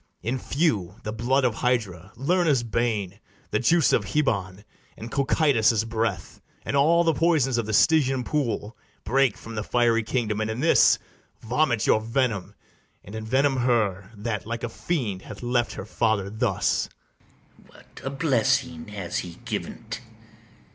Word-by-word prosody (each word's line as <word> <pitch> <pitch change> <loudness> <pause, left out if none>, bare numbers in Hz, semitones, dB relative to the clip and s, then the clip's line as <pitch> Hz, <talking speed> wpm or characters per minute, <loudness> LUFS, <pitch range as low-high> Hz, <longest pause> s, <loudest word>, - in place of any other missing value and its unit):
In 125 +4 -1
few, 115 - 0
the 105 - -4
blood 130 +4 +1
of 120 - +2
Hydra, 105 -7 -1
Lerna's 150 0 +2
bane, 110 -4 -2 0.3
The 105 - +1
juice 165 +4 +3
of - - +3
hebon, 100 -9 -1 0.3
and 115 +2 -8
Cocytus' 135 -6 +2
breath, 110 -7 -3 0.2
And - - -2
all 165 +5 +4
the 165 -1 +2
poisons 145 -6 +2
of 110 - -2
the 110 - -3
Stygian 135 0 +3
pool, 120 -6 -2 0.3
Break 130 +1 +2
from 115 - -10
the 105 -1 -3
fiery 115 0 +2
kingdom, 110 -2 -1
and 110 - -1
in 110 +2 -3
this 160 +4 +5 0.4
Vomit 120 -1 +1
your 110 - +3
venom, 115 -4 -1 0.5
and 100 - -12
envenom 130 +5 +1
her 105 -5 0
That, 105 0 -4
like 115 0 -4
a 120 - -2
fiend, 115 - -3
hath - - -10
left 120 -1 0
her - - -7
father 105 -2 0
thus! 110 -3 0 0.7
ITHAMORE. - - -22
What - - -16
a 135 - -2
blessing 130 - 0
has 100 -4 -4
he 85 -2 -7
given't! - - -5
115 Hz, 155 wpm, -25 LUFS, 105-135 Hz, 0.7 s, this